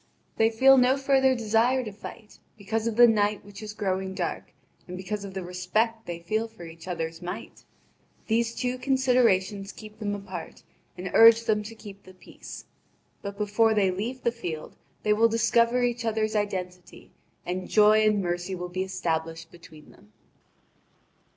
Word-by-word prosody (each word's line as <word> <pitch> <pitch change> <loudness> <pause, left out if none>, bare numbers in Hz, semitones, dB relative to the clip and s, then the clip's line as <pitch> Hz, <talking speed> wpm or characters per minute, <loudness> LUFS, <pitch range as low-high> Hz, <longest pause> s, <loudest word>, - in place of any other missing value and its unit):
They 225 0 +4
feel 265 +4 +6
no 255 +2 +4
further 270 -1 +3
desire 235 +3 +2
to 215 - -6
fight, 210 +1 -12 0.2
because 220 +2 -2
of 230 - -2
the 240 +1 +8
night 210 -2 +1
which 205 0 -11
is 215 0 -7
growing 190 -2 -2
dark, 175 -3 -4 0.4
and 180 0 -7
because 200 +2 -4
of 195 -1 -8
the 190 - -4
respect 215 +6 -1
they 175 -1 -4
feel 215 +7 -2
for 220 -6 -12
each 165 +1 -12
other's 165 -2 -4
might. 180 0 -7 0.6
These 230 +1 0
two 250 0 -2
considerations 230 -8 +2
keep 215 0 -13
them 205 -2 -2
apart, 190 -4 -8 0.3
and 180 0 -5
urge 230 0 +8
them 215 -2 +1
to 220 +2 -9
keep 200 -2 -12
the 185 -1 -16
peace. - - -11 0.6
But 200 0 -7
before 215 +2 +2
they 195 -3 +3
leave 230 +8 -4
the 235 - +2
field 175 -10 -6 0.3
they 210 - +3
will 225 +2 +4
discover 235 +2 +2
each 240 -1 -1
other's 220 -1 -1
identity, 180 -3 -4 0.3
and 180 +1 -4
joy 215 0 +5
and 210 -2 +2
mercy 175 +2 -2
will 180 0 -6
be 185 +1 -3
established 165 -3 -3
between 160 -3 -15
them. 105 - -21
210 Hz, 170 wpm, -26 LUFS, 185-230 Hz, 0.6 s, the